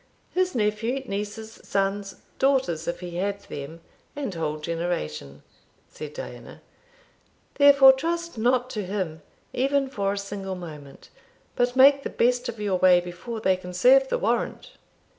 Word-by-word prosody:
"His 370 -2 0
nephew, 225 +4 0
nieces, 210 +1 -6
sons 195 0 -1 0.2
daughters, 260 - +1
if 170 - -3
he 175 -1 -6
had 200 +2 -2
them, 145 +4 -8 0.3
and 275 -8 -4
whole 155 -2 -2
generation," 150 - -4 0.5
said 150 -1 -9
Diana; - - -9 0.9
"therefore 280 -2 +8
trust 335 +4 -3
not 245 +2 +1
to 210 - -3
him, 180 -5 -4 0.3
even 275 +1 +1
for 200 -6 -1
a - - -5
single 200 -1 -5
moment, 150 -6 -11 0.5
but 245 0 +1
make 275 +2 +7
the - - -4
best 245 +1 +1
of 230 -2 -7
your 200 -3 0
way 180 -1 +6
before 180 +6 -7
they 190 -3 +3
can 180 -1 -9
serve 265 +8 +5
the - - 0
warrant." - - -2
205 Hz, 145 wpm, -25 LUFS, 175-255 Hz, 0.9 s, therefore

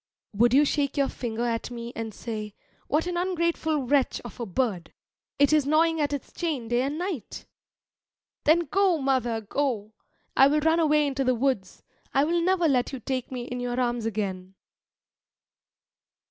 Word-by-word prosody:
Would 235 +3 +4
you 295 +2 +6
shake 285 -1 0
your 275 -1 +2
finger 235 -1 -3
at 230 -1 -2
me 235 0 -7
and 225 -1 -4
say, 215 -1 -6 0.3
"What 305 +4 +1
an 355 -1 -2
ungrateful 335 -4 0
wretch 270 +1 +1
of 240 -2 -11
a 235 - -3
bird! 190 -4 -2 0.5
It 285 +1 +4
is 300 -3 +3
gnawing 320 +1 +3
at 290 - 0
its 285 -3 -5
chain 295 -10 -3
day 240 +1 +2
and 280 +3 -2
night?" 345 - -5 1.0
Then, 320 +3 +5
go, 365 +2 +2
mother, 260 -5 0
go! 220 -2 -2 0.4
I 270 - +7
will 300 +2 +2
run 320 +2 +3
away 300 -2 +3
into 275 -1 -1
the 255 -1 +2
woods; 240 -6 -1 0.3
I 275 - +5
will 340 +3 +1
never 355 -1 +2
let 255 -4 +1
you 265 - -5
take 255 +2 -3
me 250 -2 -4
in 250 0 -5
your 245 0 -2
arms 240 -2 0
again. 190 -3 -4
265 Hz, 175 wpm, -26 LUFS, 235-305 Hz, 1.0 s, I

